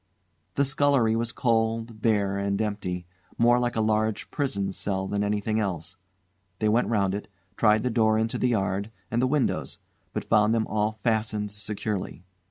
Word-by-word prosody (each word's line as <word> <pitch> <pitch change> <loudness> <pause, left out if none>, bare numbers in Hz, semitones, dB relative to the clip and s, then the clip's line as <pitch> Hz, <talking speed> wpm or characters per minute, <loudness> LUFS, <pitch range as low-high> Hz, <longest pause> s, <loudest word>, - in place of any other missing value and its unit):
The 140 - +3
scullery 135 -5 +3
was 115 +1 -1
cold, 115 -1 0
bare, 100 -4 +2
and 100 0 -1
empty; 100 -5 -2 0.3
more 120 +1 +5
like 120 -1 -1
a 110 - +1
large 110 0 0
prison 100 -9 -1
cell 95 0 -2
than 100 +1 -1
anything 105 +1 0
else. 95 -3 -3 0.6
They 110 - +1
went 115 +3 +3
round 100 -4 +1
it, 105 - -4 0.3
tried 105 0 +4
the 125 - 0
door 110 -1 +3
into 110 +1 -1
the 125 - +2
yard, 100 -2 0 0.2
and 120 +2 +1
the 130 - +3
windows, 140 -1 0 0.3
but - - -4
found 105 +1 +4
them 110 -1 +1
all 105 0 0
fastened 110 -3 0
securely. 105 -3 -4
110 Hz, 170 wpm, -26 LUFS, 100-115 Hz, 0.6 s, more